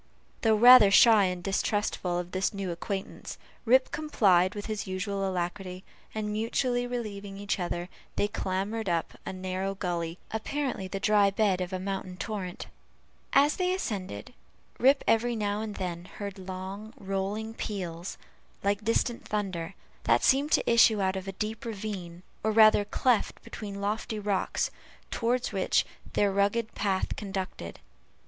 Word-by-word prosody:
Though 220 -1 +4
rather 240 -1 +9
shy 215 0 +7
and 180 -1 -2
distrustful 195 -2 0
of 175 0 -4
this 190 +2 -1
new 195 -2 -3
acquaintance, 190 +3 -5 0.3
Rip 255 +3 +4
complied 200 - +3
with 205 - -5
his 215 -3 -4
usual 195 +1 -2
alacrity; 185 +1 -4 0.3
and 210 -1 -2
mutually 245 +3 0
relieving 205 -5 -5
each 200 0 -2
other, 175 0 -3 0.3
they 205 - +2
clambered 205 +1 -2
up 170 -2 -1
a - - -2
narrow 185 +1 -3
gully, 170 -3 -3
apparently 250 -2 -2
the 195 +1 -4
dry 205 -1 +4
bed 195 -2 +1
of 180 +1 -3
a 185 - -1
mountain 190 -1 -4
torrent. 190 -4 -4 0.7
As 285 +2 +5
they 365 0 +1
ascended, 190 - -5 0.5
Rip 270 +3 +5
every 230 +2 +2
now 205 -1 -1
and 215 -2 -5
then 175 -2 -4
heard 200 0 -7
long 190 +4 -7
rolling 200 +1 -3
peals, 180 -6 -5 0.5
like 200 +1 +1
distant 230 +1 0
thunder, 190 -4 -3 0.3
that - - +3
seemed 280 +3 +3
to - - +3
issue 230 -2 +6
out 190 -1 +1
of 190 0 -5
a 195 - -4
deep 215 +3 -4
ravine, 195 -6 -6 0.2
or 220 - +2
rather 215 -1 +6
cleft 235 +2 +1
between 200 -2 -7
lofty 215 +2 -2
rocks, 205 -2 -1 0.4
toward 245 +2 0
which - - +1 0.3
their 200 -1 +3
rugged 205 +3 +1
path 195 -2 -1
conducted. 190 - -5
200 Hz, 150 wpm, -28 LUFS, 185-220 Hz, 0.7 s, rather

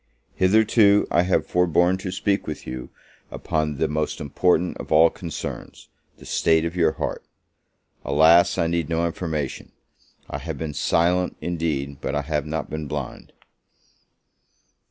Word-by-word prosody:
Hitherto 105 +1 +4
I 85 - +4
have 90 +1 +1
forborne 90 +1 +2
to 95 -1 -5
speak 100 +2 -1
with 75 -2 -6
you 65 0 -6 0.4
upon 75 -2 -2
the - - +1
most 75 0 -2
important 90 +4 +1
of - - -9
all 80 +1 +6
concerns, 85 -4 -7 0.3
the - - -15
state 80 0 +2
of 85 +1 -4
your 80 -3 +2
heart: - - -4 0.8
alas, 85 +2 +4
I - - +1
need 85 -2 -1
no 85 +1 0
information! 80 -4 -4 0.6
I - - -5
have - - -6
been 80 -2 -4
silent, 90 +5 +1
indeed, 75 -6 -3
but - - -3
I 75 - -1
have 75 0 -2
not 80 0 -3
been 80 -1 -5
blind. 70 -3 -6
80 Hz, 145 wpm, -23 LUFS, 75-90 Hz, 0.8 s, all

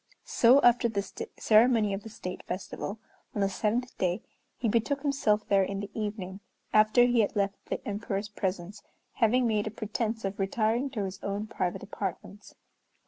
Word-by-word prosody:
So 245 +4 +5
after 240 0 +5
the 200 -3 -1 0.3
ceremony 220 -2 +4
of 195 - -3
the 225 - -9
State 180 -4 -6
Festival, 195 +3 -4 0.4
on 205 - 0
the 195 - +2
seventh 230 +5 -1
day, 180 +2 0 0.3
he 240 - -1
betook 240 +6 0
himself 225 -8 +1
there 195 -1 +4
in 195 +1 -1
the 200 0 -6
evening, 205 -3 -4 0.3
after 215 +3 +6
he 245 -1 +3
had 210 - +2
left 200 -1 -1
the - - -4
Emperor's 205 -1 -3
presence, 190 -1 -4 0.4
having 245 +2 +3
made 215 -2 +1
a - - 0
pretence 220 +1 -3
of 195 +1 -4
retiring 220 +6 +1
to 215 -7 -3
his 190 0 -6
own 200 +1 -3
private 185 -4 -3
apartments. 200 0 -6
210 Hz, 170 wpm, -29 LUFS, 195-230 Hz, 0.4 s, after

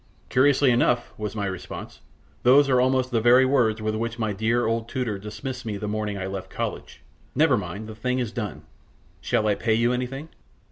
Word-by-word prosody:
"Curiously 140 0 +4
enough," 120 0 +1
was 105 -1 -5
my 105 -2 -2
response, 95 -2 -7 0.4
"those 135 +3 +6
are 125 -1 +4
almost 130 0 +1
the 115 -2 +1
very 125 +3 +6
words 115 -5 +2
with 110 0 0
which 115 +1 -3
my 110 -3 -1
dear 115 +4 +1
old 115 +1 -1
tutor 120 -7 -2
dismissed 125 +5 -6
me 110 -3 -4
the 105 - -5
morning 105 -1 -2
I 95 - -4
left 95 0 -5
college. - - -5 0.3
Never - - +4
mind, 110 +2 -5
the 110 - -7
thing 125 +4 -2
is 120 -4 -2
done. 115 -4 -5 0.6
Shall 110 - 0
I 105 - +3
pay 110 +2 +1
you 120 +2 +2
anything?" 135 +5 -4
115 Hz, 195 wpm, -25 LUFS, 105-125 Hz, 0.6 s, those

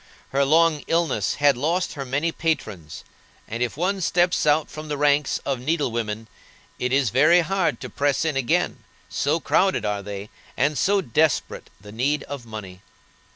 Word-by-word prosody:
Her 140 +1 +2
long 155 +1 +3
illness 160 - +1
had 145 -2 +4
lost 165 +8 -1
her 140 -2 -5
many 145 +6 0
patrons, 120 - -3 0.4
and 115 +2 -5
if 125 +2 -1
one 190 +3 0
steps 175 -2 +2
out 150 +1 +3
from 155 0 -9
the 150 -1 -3
ranks 145 0 +2
of 135 -3 -1
needle 145 0 0
women, 110 -1 -3 0.5
it 125 - -1
is 135 -5 +2
very 155 +8 +5
hard 190 +1 0
to - - -5
press 145 +2 0
in 155 -3 0
again, 130 -3 0 0.3
so 150 +3 0
crowded 175 - +1
are 105 -1 -1
they, 100 +1 -7 0.3
and 150 +1 +2
so 195 +9 +2
desperate 155 0 0
the 105 +2 -12
need 135 +6 0
of 140 -5 -8
money. 95 -5 -8
145 Hz, 170 wpm, -23 LUFS, 120-160 Hz, 0.5 s, very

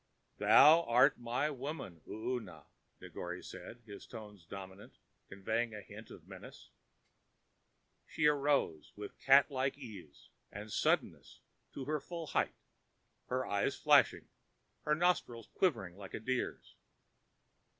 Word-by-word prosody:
"Thou 155 +4 +8
art 120 +1 +4
my 120 +6 -1
woman, 135 - -6
Oona," 110 -6 -5 0.3
Negore 90 +1 -7
said, 120 0 -10
his 100 -3 -11
tones 105 -6 -11
dominant 95 +1 -10 0.3
and 95 0 -12
conveying 115 -2 0
a 105 - -7
hint - - -12
of - - -13
menace. - - -12 1.4
She 155 - -1
arose 145 - +1
with 105 0 -9
catlike 135 0 +4
ease 100 - -12 0.2
and 105 +1 -8
suddenness - - 0 0.3
to 135 - -6
her 150 +2 -1
full 170 +2 -6
height, - - 0 0.7
her 130 +1 -1
eyes 100 0 0
flashing, - - +4 0.6
her 150 - +3
nostrils 150 -9 0
quivering 100 - 0
like 100 -2 -8
a - - -4
deer's. 130 +3 -3
120 Hz, 120 wpm, -34 LUFS, 100-140 Hz, 1.4 s, Thou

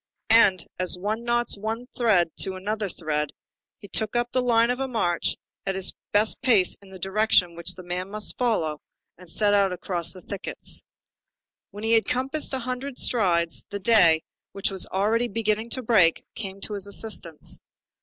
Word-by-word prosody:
And, 195 -6 +5
as 185 0 +2
one 215 +5 -3
knots 240 0 +1
one 220 +4 -4
thread 195 -9 +3
to 190 -1 +1
another 205 +2 -2
thread, 150 -4 -2 0.4
he 200 - -12
took 215 +3 0
up 240 0 0
the 255 - +1
line 235 -1 +3
of 250 - -3
march 175 -8 0 0.3
at 195 -1 -2
his 190 -1 0 0.2
best 210 +1 +2
pace 225 -9 +3
in 200 - -16
the 190 - -10
direction 190 -2 +2
which 170 0 -1
the 185 - -10
man 180 +2 -4
must 210 +1 -3
follow, 165 - 0 0.4
and 180 -2 -13
set 205 +3 +2
out 200 -2 +4
across 175 -1 -3
the 185 - -9
thickets. 200 - -5 0.9
When 205 +1 -10
he 225 - +1
had 225 -1 +4
compassed 270 +4 0
a - - 0
hundred 255 +1 -5
strides, 170 -8 +1
the 200 - -4
day, 175 -7 +5 0.3
which 195 0 -1
was 190 -1 +2
already 220 +5 +1
beginning 220 0 -1
to 255 - -4
break, 195 -8 +3
came 195 -2 -7
to 210 - -1
his 200 -1 -6
assistance. 200 -6 0
205 Hz, 175 wpm, -25 LUFS, 185-230 Hz, 0.9 s, And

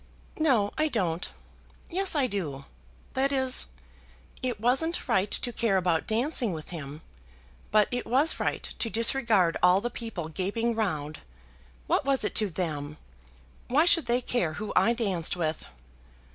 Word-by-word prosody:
"No, 245 -10 +2
I 310 - +3
don't. 180 - -1 0.6
Yes, 380 0 +1
I 285 -3 +3
do; 155 - -4 0.5
that 270 +1 +1
is. 260 -2 +4 0.7
It 245 -5 -2
wasn't 270 +9 0
right 205 -5 +1
to 245 - 0
care 220 -5 +1
about 175 -3 0
dancing 235 - +1
with 155 -1 -8
him, 155 -2 -7 0.7
but 210 -1 +4
it 245 0 -3
was 275 +7 +2
right - - -1 0.2
to 230 - 0
disregard 225 -6 +2
all 180 +1 +5
the 240 +4 -3
people 225 -9 -5
gaping 205 +8 -1
round. 155 -9 -2 0.7
What - - +1
was 275 -1 +1
it - - -1
to 210 - 0
them? 155 -4 -4 0.7
Why 290 +6 +3
should 330 -6 +3
they 240 +1 +1
care 210 -10 -1
who 205 +5 -5
I 190 +6 +4
danced 195 -9 0
with?" 155 - -2
220 Hz, 150 wpm, -27 LUFS, 175-250 Hz, 0.7 s, all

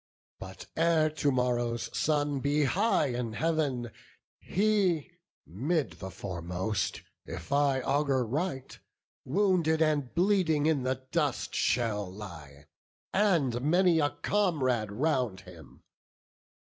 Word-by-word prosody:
But 95 0 -9
ere 160 -1 +3
to 150 -2 0
morrow's 120 -2 -1
sun 145 -2 +1
be 145 +2 +1
high 175 -1 +2
in 120 -2 -3
Heav'n, 135 -3 -1 0.5
He, 195 -6 +1 0.3
'mid 125 - -2
the 95 - -6
foremost, 90 +2 -3 0.2
if 85 0 -8
I 140 -2 +2
augur 135 -2 +1
right, 135 +2 -3 0.5
Wounded 170 -1 +2
and 150 -5 +1
bleeding 175 -5 +2
in 155 -3 +2
the 130 0 -2
dust 150 -7 -1
shall 105 -6 0
lie, 80 -8 -10 0.5
And 165 - +2
many 170 +3 +3
a 145 -1 +2
comrade 130 - +1
round 125 - 0
him. 85 -6 -15
140 Hz, 110 wpm, -29 LUFS, 115-160 Hz, 0.5 s, ere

